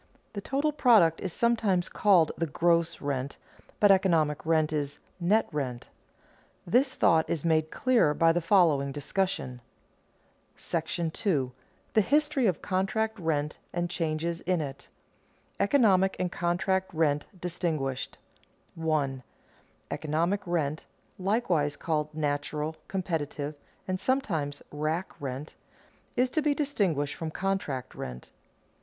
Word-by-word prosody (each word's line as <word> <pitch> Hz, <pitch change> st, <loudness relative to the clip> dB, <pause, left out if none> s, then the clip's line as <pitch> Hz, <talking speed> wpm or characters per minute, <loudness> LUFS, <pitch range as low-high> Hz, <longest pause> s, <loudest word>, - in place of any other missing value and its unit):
The 200 Hz, -, -4 dB
total 280 Hz, +8 st, 0 dB
product 220 Hz, -, +4 dB
is 190 Hz, -, -3 dB
sometimes 210 Hz, -5 st, +1 dB
called 185 Hz, -7 st, +4 dB
the 165 Hz, -, -1 dB
"gross 170 Hz, +2 st, +1 dB
rent," 140 Hz, -1 st, -3 dB, 0.4 s
but 205 Hz, -1 st, +6 dB
economic 165 Hz, -6 st, +3 dB
rent 155 Hz, -1 st, +2 dB
is 145 Hz, -2 st, -2 dB, 0.2 s
"net 205 Hz, +6 st, +3 dB
rent." 130 Hz, -5 st, -4 dB, 0.8 s
This 260 Hz, +8 st, +2 dB
thought 160 Hz, -1 st, +3 dB
is 165 Hz, -1 st, -2 dB
made 155 Hz, -1 st, +2 dB
clearer 235 Hz, -12 st, +2 dB
by 165 Hz, +1 st, +5 dB
the 175 Hz, +1 st, 0 dB
following 160 Hz, -7 st, +3 dB
discussion. 145 Hz, -4 st, -2 dB, 1.0 s
§ -, -, -2 dB, 0.3 s
II. 135 Hz, -9 st, +2 dB, 0.4 s
THE 215 Hz, -, +5 dB
HISTORY 295 Hz, +1 st, +2 dB
OF 180 Hz, -5 st, -1 dB
CONTRACT 215 Hz, +3 st, 0 dB
RENT 150 Hz, -3 st, -1 dB
AND 175 Hz, 0 st, -2 dB
CHANGES 165 Hz, -1 st, -2 dB
IN 180 Hz, -1 st, 0 dB
IT 135 Hz, -2 st, -7 dB
[Sidenote: -, -, -38 dB
Economic 200 Hz, -6 st, +4 dB
and 180 Hz, -1 st, -1 dB
contract 185 Hz, +2 st, 0 dB
rent 150 Hz, -2 st, +1 dB
distinguished] 160 Hz, -7 st, -2 dB, 0.6 s
1. 150 Hz, -5 st, -1 dB, 0.7 s
_Economic 165 Hz, +6 st, 0 dB
rent 155 Hz, -3 st, -1 dB, 0.4 s
(likewise 180 Hz, -7 st, +1 dB
called 155 Hz, -2 st, -1 dB
natural, 150 Hz, +1 st, -2 dB
competitive, 155 Hz, -6 st, -3 dB, 0.3 s
and 185 Hz, 0 st, -1 dB
sometimes 170 Hz, -, -1 dB
rack 155 Hz, +5 st, -2 dB
rent) 135 Hz, +2 st, -5 dB, 0.6 s
is 250 Hz, +1 st, +2 dB
to 310 Hz, -, +1 dB
be 295 Hz, -1 st, +2 dB
distinguished 190 Hz, -, 0 dB
from 165 Hz, -, -5 dB
contract 155 Hz, -8 st, -2 dB
rent. 65 Hz, 0 st, -8 dB
165 Hz, 125 wpm, -28 LUFS, 150-195 Hz, 1.0 s, but